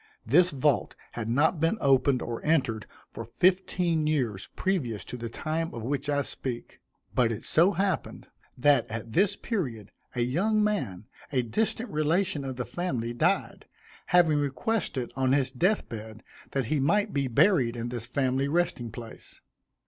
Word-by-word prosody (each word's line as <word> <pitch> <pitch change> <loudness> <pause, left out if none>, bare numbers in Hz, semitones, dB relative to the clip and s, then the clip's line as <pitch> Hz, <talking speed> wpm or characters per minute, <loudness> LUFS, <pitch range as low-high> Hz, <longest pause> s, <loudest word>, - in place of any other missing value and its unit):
This 170 +10 +5
vault 140 -3 +1 0.2
had 115 -2 -4
not 150 +7 +2
been 165 +7 +1
opened 135 -2 +3
or 115 -1 -5
entered 130 -9 +1 0.2
for 115 - -6
fifteen 175 - +1
years 120 -11 -1
previous 140 - -1
to - - -6
the 120 -1 -5
time 160 +6 -3
of 115 - -6
which 140 +3 -2
I 145 -1 +1
speak; 125 -3 -5 0.3
but 120 -2 +3
it 110 - -5
so 175 +5 +4
happened, 190 +2 -2 0.3
that 145 +2 +4
at 115 0 -6
this 195 - +2
period, 125 - -4 0.2
a 120 - 0
young 195 - +2
man, 130 - -1 0.3
a 130 -3 +1
distant 220 - -1
relation 155 0 +1
of 135 -1 -4
the 125 -1 -3
family, 120 -4 -3
died, 120 - 0 0.4
having 165 -4 +4
requested 140 - -1
on 130 0 +2
his 135 -2 +2
death 180 - +1
bed, 110 -1 -8 0.3
that 135 -3 -1
he 150 +6 0
might 205 +9 +2
be 140 -2 0
buried 125 - +3
in 120 +1 -3
this 120 -2 -4
family 135 0 0
resting 165 -6 0
place. 115 0 -10
140 Hz, 160 wpm, -28 LUFS, 120-170 Hz, 0.4 s, This